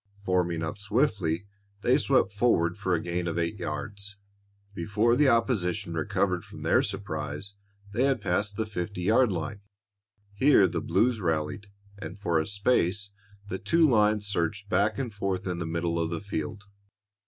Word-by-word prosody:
Forming 90 -3 +1
up 80 +5 -4
swiftly, 100 - 0 0.4
they - - +4
swept 95 - +2
forward 95 -6 +2
for 95 -3 0
a - - 0
gain 85 +1 -2
of 85 - -2
eight 85 +4 -1
yards. 100 +5 -5 0.6
Before 105 +6 +1
the 140 +1 +4
opposition 110 -8 +1
recovered 80 -2 0
from - - -11
their - - +4
surprise, 80 +1 -4 0.4
they 125 +5 +2
had 135 -1 +2
passed 100 +3 -1
the 110 - 0
fifty 100 -2 -4
yard 115 +4 +4
line. 85 +3 -4 0.7
Here 105 -2 +5
the 85 -1 -3
blues 110 +9 +2
rallied, 80 +4 -1 0.3
and 95 -2 -7
for 85 -5 +1
a 80 - -2
space 100 -1 +1 0.4
the 95 -1 -4
two 165 -1 +3
lines 105 -4 +3
surged 100 +1 -2
back 110 +1 +2
and 125 -5 -3
forth 95 -2 -2
in 90 -2 -2
the 85 - -3
middle 85 0 -1
of 85 -1 0
the 85 -1 -3
field. 100 +1 -5
100 Hz, 165 wpm, -28 LUFS, 85-105 Hz, 0.7 s, Here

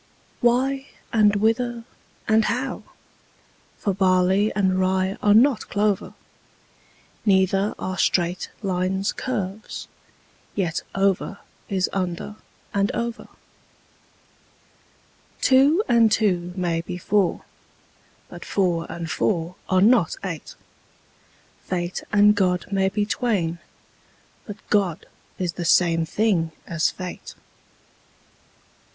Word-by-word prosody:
Why, 265 +3 +1 0.3
and 210 -2 +4
whither, 230 +3 0 0.4
and 220 0 +4
how? 255 +2 -2 1.0
for 200 - -1
barley 190 +2 +3
and 190 -2 +2
rye 190 +1 +1
are 205 0 +4
not 255 +1 +4
clover: 205 -1 0 1.1
Neither 195 0 +2
are 185 0 -4
straight 175 0 +1
lines 190 +1 -1
curves: 215 -4 -4 0.7
yet 175 -5 -1
over 195 0 0 0.3
is 190 -2 +1
under 185 +2 -3 0.4
and 200 0 +1
over. 235 0 -4 2.1
Two 280 +8 +4
and 230 -3 +4
two 180 -5 +1
may 170 -3 -1
be 175 +1 -6
four: 190 0 0 0.8
but - - -10
four 175 -5 0
and 170 0 -5
four 170 -3 0 0.2
are 185 -1 +3
not 215 -5 +4
eight: 170 -6 -6 1.1
Fate 175 -1 -2
and 210 0 +6
God 185 -3 +1
may 195 -1 +2
be 205 +1 -1
twain: 200 -7 -1 0.9
but 205 -1 -7
God 190 -6 +1 0.3
is 180 -3 -2
the 175 - -5
same 165 -1 +3
thing 175 -6 +1
as 165 -2 +1
fate. 185 -1 -8
195 Hz, 105 wpm, -23 LUFS, 180-215 Hz, 2.1 s, and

